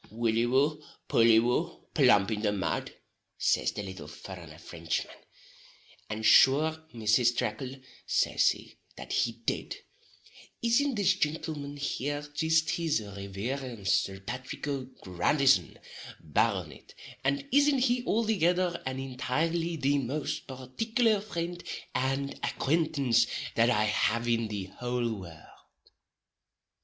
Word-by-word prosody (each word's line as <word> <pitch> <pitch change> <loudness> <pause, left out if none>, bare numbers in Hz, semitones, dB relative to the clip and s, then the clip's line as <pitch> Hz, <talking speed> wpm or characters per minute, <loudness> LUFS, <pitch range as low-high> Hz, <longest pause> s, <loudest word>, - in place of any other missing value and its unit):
"Wully 115 +1 +1
woo, 145 +4 +2 0.3
pully 115 -1 +5
woo, 120 +2 -1
plump 100 +1 +4
in 105 -1 -1
the 105 -2 +1
mud," 95 -6 -2 0.5
says - - +2
the 105 - -4
little 95 -1 -8
furrenner 85 -5 -10
Frinchman, 85 0 -4 1.0
"and 110 0 -4
sure 150 +7 +5
Mrs. 115 +2 +2
Tracle," 125 +3 -2 0.3
says - - +3
he, - - -6 0.2
that - - -6
he - - +1
did, - - -2 0.9
"isn't 245 +4 +2
this 195 -3 +3
gintleman 150 -3 -3
here 145 +1 -2
jist 160 +1 +2
his 165 -6 0
reverence 100 +3 -4
Sir 95 0 0
Pathrick 125 +8 -6
O'Grandison, 130 - +1 0.4
Barronitt, 95 0 -2 0.3
and 140 - 0
isn't 285 -1 +4
he 245 -1 +1
althegither 185 -6 +1
and 130 0 -3
entirely 160 +6 -1
the 145 -1 +1
most 135 +3 -3
particular 210 - 0
frind 175 -4 -5 0.3
and 135 +1 -1
acquaintance 140 -6 +1 0.3
that 115 +1 +3
I 110 -3 +3
have 110 +2 +1
in 115 -1 +1
the 100 -3 -5
houl 120 -2 -1
world?" 85 -4 -11
130 Hz, 115 wpm, -29 LUFS, 110-160 Hz, 1.0 s, pully